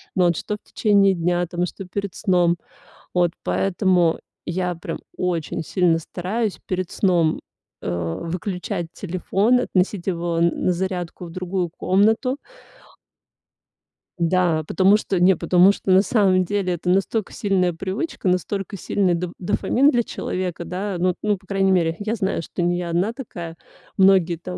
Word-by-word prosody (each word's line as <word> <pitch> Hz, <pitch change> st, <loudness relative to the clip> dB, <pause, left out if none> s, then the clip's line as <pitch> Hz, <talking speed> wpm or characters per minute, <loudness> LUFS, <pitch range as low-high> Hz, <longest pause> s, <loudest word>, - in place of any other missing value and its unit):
Но 180 Hz, -, +4 dB
вот 170 Hz, -2 st, +1 dB
что 210 Hz, -, -3 dB
в -, -, -32 dB
течение 200 Hz, -3 st, +4 dB
дня 175 Hz, +1 st, 0 dB
там, 175 Hz, +1 st, -1 dB
что 190 Hz, +2 st, -8 dB
перед 200 Hz, 0 st, -4 dB
сном. 175 Hz, -3 st, +2 dB, 0.6 s
Вот 175 Hz, -1 st, +2 dB
поэтому 180 Hz, -3 st, +2 dB, 0.3 s
я 180 Hz, +1 st, -1 dB
прям 165 Hz, -, -6 dB, 0.2 s
очень 170 Hz, -3 st, -2 dB
сильно 175 Hz, -2 st, +2 dB
стараюсь 190 Hz, +6 st, -3 dB
перед 185 Hz, -1 st, -2 dB
сном, 175 Hz, -5 st, +2 dB, 0.4 s
э, -, -, -3 dB, 0.3 s
выключать 180 Hz, 0 st, -4 dB
телефон, 195 Hz, +6 st, +1 dB
относить 185 Hz, -3 st, 0 dB
его 170 Hz, -2 st, -1 dB
на 170 Hz, +1 st, +1 dB
зарядку 180 Hz, -1 st, -3 dB
в 170 Hz, -, -8 dB
другую 185 Hz, 0 st, -2 dB
комнату. 220 Hz, +9 st, +2 dB, 1.8 s
Да, 170 Hz, -2 st, +2 dB
потому 195 Hz, +2 st, +4 dB
что, 195 Hz, -4 st, -2 dB
не 185 Hz, +1 st, +5 dB
потому 180 Hz, +3 st, +5 dB
что, 200 Hz, -, -6 dB
на 185 Hz, +1 st, +7 dB
самом 195 Hz, -4 st, +3 dB
деле, 190 Hz, -1 st, -1 dB
это 175 Hz, +1 st, -3 dB
настолько 195 Hz, +3 st, 0 dB
сильная 185 Hz, -3 st, +1 dB
привычка, 195 Hz, -, -4 dB
настолько 195 Hz, +2 st, -1 dB
сильный 190 Hz, 0 st, +1 dB
доф 175 Hz, 0 st, -3 dB
дофамин 245 Hz, +8 st, +2 dB
для 240 Hz, -5 st, +2 dB
человека. 180 Hz, -5 st, -4 dB
Да, 185 Hz, +1 st, -3 dB
ну, 180 Hz, 0 st, +1 dB
ну, 210 Hz, -1 st, +1 dB
по 190 Hz, +1 st, -24 dB
крайней 195 Hz, -1 st, +2 dB
мере, 165 Hz, -3 st, +2 dB
я 215 Hz, +2 st, -2 dB
знаю, 190 Hz, -6 st, -1 dB
что 170 Hz, -, -5 dB
не 175 Hz, 0 st, +1 dB
я 175 Hz, -1 st, -3 dB
одна 180 Hz, +7 st, 0 dB
такая. 175 Hz, -11 st, -7 dB, 0.4 s
Многие 190 Hz, -3 st, +5 dB
там 180 Hz, +2 st, -7 dB
185 Hz, 155 wpm, -22 LUFS, 175-195 Hz, 1.8 s, на